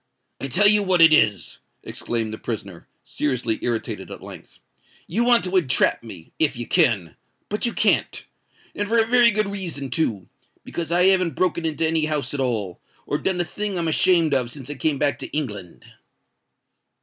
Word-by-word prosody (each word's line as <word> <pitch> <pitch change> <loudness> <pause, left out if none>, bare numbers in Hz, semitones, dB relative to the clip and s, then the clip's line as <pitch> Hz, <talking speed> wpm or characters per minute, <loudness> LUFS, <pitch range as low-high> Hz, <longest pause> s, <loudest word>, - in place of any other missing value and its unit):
"I 135 - -4
tell 185 +11 +2
you 210 0 +5
what 185 -3 +1
it 160 -1 +7
is," 105 - +1 0.2
exclaimed 115 -2 -3
the 110 - -7
prisoner, 100 -6 -6 0.2
seriously 125 -6 -2
irritated 120 -2 -3
at - - -10
length; - - -12 0.5
"you 220 +8 +1
want 240 -1 +4
to 185 +1 -3
entrap 155 -9 +2
me, 95 -8 -12
if 155 -6 +2
you 120 - -4
can—but 140 - -1
you 235 - -3
can't. - - 0 0.5
And 205 - -3
for 230 - +2
a 225 - +4
very 240 0 +5
good 215 -1 +1
reason 175 -9 -2
too—because 155 - -5
I 175 +1 +3
haven't 185 -3 +3
broken 170 -2 0
into 160 +1 -1
any 160 -1 +1
house 150 -2 -2
at 145 - -3
all, 110 -9 -2 0.2
or - - -2
done 185 -2 -1
a - - -2
thing 205 +2 -4
I'm 170 -1 -1
ashamed 165 -1 +3
of 125 -3 +1
since 135 +2 -9
I - - -2
came 145 +1 -1
back 145 0 0
to - - -5
England." 105 - -6
155 Hz, 180 wpm, -22 LUFS, 120-185 Hz, 0.5 s, it